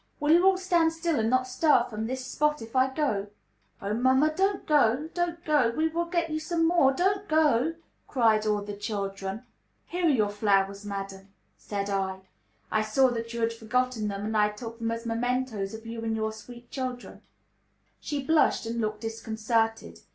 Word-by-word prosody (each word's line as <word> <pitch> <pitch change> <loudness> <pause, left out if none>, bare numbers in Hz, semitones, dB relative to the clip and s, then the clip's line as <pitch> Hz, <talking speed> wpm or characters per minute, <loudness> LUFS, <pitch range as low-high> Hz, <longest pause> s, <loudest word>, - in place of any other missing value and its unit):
Will 295 0 +2
you 345 +3 +6
all 385 -1 +5
stand 345 -3 +2
still 325 -3 -1
and 220 0 +1
not 255 +1 +2
stir 255 -1 +3
from 220 0 -4
this 260 +1 -4
spot 300 +3 0
if 225 +2 -10
I 260 +1 +3
go?" 260 -9 -1 0.6
"Oh, 200 +1 -1
mamma, 260 +6 +3
don't 390 +2 0
go, 290 -1 +3
don't 345 -1 -2
go. 295 -7 +3
We 320 +1 +2
will 340 +2 -1
get 340 -1 -1
you 310 - -1
some 330 +1 0
more. 335 -6 +4
Don't 390 +7 0
go," 310 -1 +3 0.3
cried 220 -4 +2
all 210 -1 +1
the 205 0 -6
children. 200 0 -4 0.4
"Here 355 0 -1
are - - +5
your 215 -8 +2
flowers, 200 -1 +1
madam," 195 -1 -6 0.2
said 200 -1 -4
I. 190 -1 -2 0.5
"I 215 - +2
saw 235 +5 +3
that 230 -1 -4
you 235 - -3
had 230 0 +1
forgotten 230 0 -1
them, 200 0 -4
and 220 +1 -2
I 210 -1 +4
took 225 +2 -8
them 230 0 -1
as 230 +1 -4
mementoes 230 -3 -2
of 220 +1 -11
you 230 0 -6
and 225 -1 -1
your 220 0 -2
sweet 240 +2 -12
children." 255 -2 -5 0.8
She 285 -2 -4
blushed 315 -5 +3
and 230 +1 -2
looked 215 -1 -2
disconcerted. 225 0 -2
235 Hz, 190 wpm, -27 LUFS, 215-300 Hz, 0.8 s, you